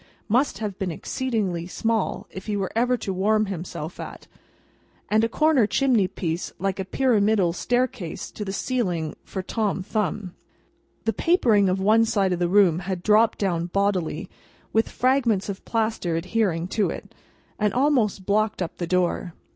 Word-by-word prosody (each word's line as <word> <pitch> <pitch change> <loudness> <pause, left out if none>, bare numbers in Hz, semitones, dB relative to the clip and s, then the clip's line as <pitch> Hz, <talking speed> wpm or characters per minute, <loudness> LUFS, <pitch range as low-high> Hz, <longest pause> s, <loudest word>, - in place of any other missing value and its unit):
must 240 -1 +2
have 210 -2 -4
been 190 -2 -1
exceedingly 190 -2 -2
small 225 +2 -1
if 190 +2 -9
he 210 -1 -1
were 195 -2 -2
ever 245 +2 +3
able 240 - -9
to 195 - -2
warm 215 +3 +2
himself 175 -3 -6
at, - - -8 0.9
and 215 +1 +4
a 230 - +2
corner 305 -5 +3
chimney 245 -6 +2
piece 170 -2 -3
like 195 +1 -2
a 190 - -2
pyramidal 210 -6 +2
staircase 245 -4 -2
to 210 - -6
the 195 - -4
ceiling 185 - -1
for 190 - -5
Tom 205 -2 -1
Thumb. 205 -2 -2 0.7
The 225 - +1
papering 220 - +3
of 185 +1 0
one 215 +4 +4
side 195 -4 +1
of 175 - -2
the 175 -1 +1
room 185 -4 +4
had 185 -1 -4
dropped 215 +2 +4
down 175 -4 0
bodily, 195 -2 0 0.5
with 225 +1 +2
fragments 240 -6 +1
of 195 - -5
plaster 220 -7 -1
adhering 175 -1 0
to 210 0 +1
it, - - -7 0.5
and 210 -1 +2
almost 245 -7 +1
blocked 210 -1 +1
up 165 - -7
the 175 - -3
door. 180 -1 0
200 Hz, 165 wpm, -24 LUFS, 185-225 Hz, 0.9 s, and